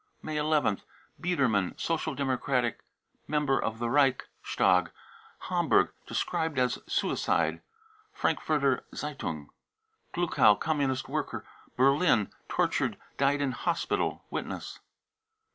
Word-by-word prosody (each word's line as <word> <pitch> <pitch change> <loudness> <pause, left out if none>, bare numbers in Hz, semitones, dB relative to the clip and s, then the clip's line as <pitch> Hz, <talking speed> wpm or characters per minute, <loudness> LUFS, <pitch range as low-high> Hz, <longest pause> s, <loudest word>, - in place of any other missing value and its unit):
May 155 -1 -2
1 150 -3 +2
ith. - - -23 0.4
biedermann, 130 - +1
Social 165 -4 -1
Democratic 130 -3 0 0.5
member 150 -3 +1
of 110 0 -2
the 120 - -3
Reic 135 0 +3 0.2
stag, 90 0 +3 0.5
Hamburg, - - +2 0.2
described 160 -3 -1
as 125 -1 +1
suicide. - - 0 0.3
( 430 0 -32
Frankfurter 140 -4 +1
Z 150 - -3
e 150 - -5
^ 140 - -10
un 75 -3 -4
i 440 - -21
gluckow, 155 -11 +4
Communist 140 -4 0
worker, - - -3 0.3
Berlin, 135 - +4 0.2
tortured, - - +1 0.2
died 140 +1 +2
in 140 -2 +1
hosj 170 +5 -1
tal. - - 0
(Witness.) - - -5
140 Hz, 125 wpm, -29 LUFS, 125-155 Hz, 0.5 s, gluckow